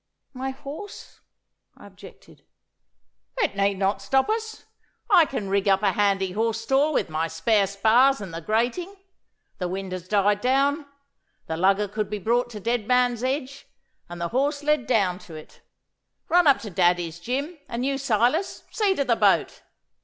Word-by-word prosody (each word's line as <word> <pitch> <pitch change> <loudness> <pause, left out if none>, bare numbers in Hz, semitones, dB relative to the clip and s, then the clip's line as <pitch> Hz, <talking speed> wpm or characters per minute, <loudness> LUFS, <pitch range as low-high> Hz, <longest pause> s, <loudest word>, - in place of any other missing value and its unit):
'My 260 +1 -4
horse!' 290 +9 -10 0.6
I - - -15
objected. - - -16 0.9
'It 420 - 0
need 200 0 +1
not 195 +1 0
stop 265 - +1
us. 440 0 -4 0.5
I 350 -5 +7
can 260 -8 -4
rig 195 +1 0
up 195 +1 +3
a 200 - +3
handy 195 -1 +1
horse 225 +3 -1
stall 270 +6 +2
with - - 0
my 160 0 -2
spare 195 +5 +1
spars 225 +7 +3
and 195 -5 -8
the 165 - -5
grating. 240 - -1 0.6
The 180 - -2
wind 190 +1 -5
has 185 -1 -6
died 205 +1 +2
down. 280 +4 +1 0.6
The 160 - -4
lugger 195 +4 +2
could 210 +1 -4
be 210 - -3
brought 235 +5 0
to 215 -3 -8
Dead 230 +1 -2
Man's 250 -1 +2
Edge, 275 +1 -3 0.4
and 175 0 -8
the 170 0 -2
horse 285 +4 -1
led 300 -5 +1
down 195 -7 +1
to 170 -6 -12
it. 155 - -13 0.7
Run 350 -1 +4
up 280 - +6
to 210 - -7
Daddy's, 175 -2 +1
Jim; 280 - -4
and 240 +2 -3
you, 275 0 -1
Silas, 255 - 0
see 405 -3 +1
to 280 - 0
the 235 - +2
boat. - - +2
225 Hz, 170 wpm, -24 LUFS, 195-275 Hz, 0.9 s, I